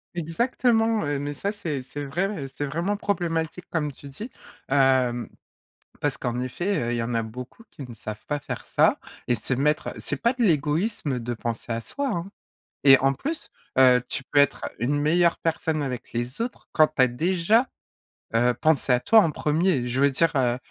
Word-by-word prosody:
Exactement, 225 +6 +1
heu, 145 -1 -1
mais 145 +1 -3
ça 200 +8 -2
c'est 160 -10 -3
c'est 130 +3 -7
vrai 175 +4 -2
et 135 - -5
c'est 140 +2 -4
vraiment 170 +8 -1
problématique 170 -4 -2
comme 150 -3 -2
tu 140 +1 -12
dis. 210 - -8 0.4
Hem, 130 -3 +2 0.7
parce 145 -3 -1
qu'en 120 0 -2
effet, 175 +10 -1
heu, - - -1
il - - 0
y 115 - -1
en 120 +1 -3
a 115 - +1
beaucoup 125 - -9
qui 135 -3 -9
ne 120 - -9
savent 110 -2 -8
pas 145 0 -2
faire - - -6
ça - - +3 0.3
et 120 - +2
se 110 +5 -2
mettre 150 +4 0
c'est 145 - -4
pas 235 - +2
de 255 - -5
l'égoïsme 155 - +1
de 120 +1 -3
penser 115 +1 -4
à 115 - -1
soi, 280 - -4
hein. 175 +2 -4 0.5
Et 135 -1 +9
en 135 0 +3
plus, 310 - -5 0.3
heu, 125 -1 +6
tu 135 - -4
peux 145 - -4
être 140 - +2
une 140 +5 +1
meilleure 170 +3 +3
personne 160 -1 -1
avec 130 -4 -5
les 120 +2 -3
autres 245 +2 -5
quand 155 -1 +5
tu 155 - -1
as 130 - +6
déjà, 180 - +2 0.7
heu, 120 +2 +3
pensé 155 -4 +2
à 125 - +4
toi 220 - +6
en 190 - +4
1er. 150 -3 +1
Je 125 +2 -2
veux 140 0 +5
dire, 165 +4 +2
heu, 125 -2 +2
145 Hz, 200 wpm, -25 LUFS, 125-175 Hz, 0.7 s, Et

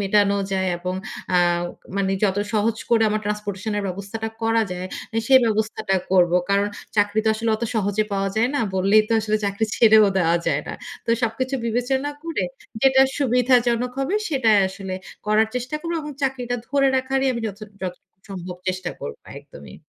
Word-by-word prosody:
মেটানো 200 0 +3 0.2
যায়, 190 -1 +1
এবং 180 +1 -3 0.4
আ - - +6 0.6
মানে 195 -1 +1
যত 195 -2 +1 0.2
সহজ 220 +1 +1
করে 230 -1 +4
আমার 215 0 0
ট্রান্সপোর্টেশন 210 0 -3
এর - - -2
ব্যবস্থাটা 200 +4 -5
করা 225 0 +3
যায় 180 0 -4 0.3
আ - - -1
সেই 265 +1 +8
ব্যবস্থাটা 220 -3 0 0.2
করব। 180 -2 +4 0.2
কারণ 200 +1 +3 0.3
চাকরি 205 +1 +2
তো 220 - +3
আসলে 225 +1 -1
অত 235 - -12
সহজে 210 0 +1
পাওয়া 195 0 0
যায় 230 +3 +3
না। 285 - +1
বললেই 195 +3 +4
তো 230 - 0
আসলে 215 0 0
চাকরি 200 +2 0
ছেড়েও 220 -2 +6
দেওয়া 170 -1 +3
যায় - - +2
না। - - -3 0.3
তো - - -30
সবকিছু 255 +4 -1
বিবেচনা 255 +5 0
করে 325 - -2 0.4
যেটা 265 0 +5 0.2
সুবিধাজনক 250 -2 +2
হবে, 275 +9 -1
সেটাই 235 -9 +3
আসলে 190 0 -6 0.3
করার 215 +1 +3
চেষ্টা 250 +3 -3
করব, 335 +2 -4
এবং 300 - -6
চাকরিটা 250 -2 -1
ধরে 275 0 +3
রাখারই 265 +1 0
আমি 235 - -4
যত 205 -2 -6 0.2
যতটুকু 180 0 -7
সম্ভব 180 -2 -6
চেষ্টা 185 -1 -2
করবো 460 +1 -7 0.2
একদমই। - - -13
220 Hz, 175 wpm, -22 LUFS, 200-250 Hz, 0.6 s, সেই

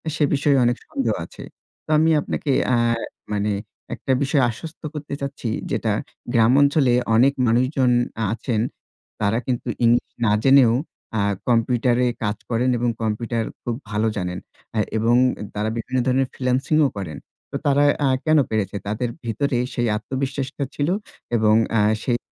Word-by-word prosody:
সে 150 - +1
বিষয়ে 140 0 +3
অনেক 120 +1 +2
সন্দেহ 280 -3 -1
আছে। - - -11 0.4
তো - - -19
আমি 160 +1 +4
আপনাকে 145 - -2 0.3
আর 115 0 +1 0.3
মানে 105 +1 0 0.4
একটা 135 - -3
বিষয়ে 140 -1 +2
আশ্বস্ত 160 +8 -8
করতে 150 -1 -6
চাচ্ছি, 140 -4 -4 0.2
যেটা - - 0 0.4
গ্রাম 115 +1 +5
অঞ্চলে 140 -3 +4 0.2
অনেক 130 +5 +5
মানুষজন 125 +2 +2 0.3
আ - - +1
আছেন। 115 -2 -1 0.6
তারা 105 +2 +2
কিন্তু 125 -1 -2 0.2
ইংলিশ 120 +1 +3
না 105 - +3
জেনেও 135 -4 +6 0.5
আ - - +2 0.3
কম্পিউটারে 120 +1 +2 0.2
কাজ 105 0 -1
করেন 120 +2 +1
এবং 120 +1 0
কম্পিউটার 115 +1 -1 0.2
খুব 120 - -2
ভালো 110 +1 0
জানেন। 90 -2 -3 0.4
আ - - -1 0.2
এবং 115 +2 +3 0.4
তারা 105 +1 -1
বিভিন্ন 130 +3 -3
ধরনের 130 0 +2
ফ্রিল্যান্সিংও 135 +4 +2
করেন। 80 -7 -5 0.3
তো - - -6
তারা 145 0 +4 0.2
আ - - +3 0.2
কেন 155 -1 +4
পেরেছে? 105 -2 -1
তাদের 115 +3 -1 0.2
ভিতরে 120 +3 0 0.2
সেই 120 -2 0
আত্মবিশ্বাসটা 135 +4 -3
ছিল 145 +2 0 0.5
এবং 110 -1 +4 0.2
অ্যা 115 -2 +3 0.2
সেই 120 -2 +1
120 Hz, 150 wpm, -22 LUFS, 115-140 Hz, 0.6 s, জেনেও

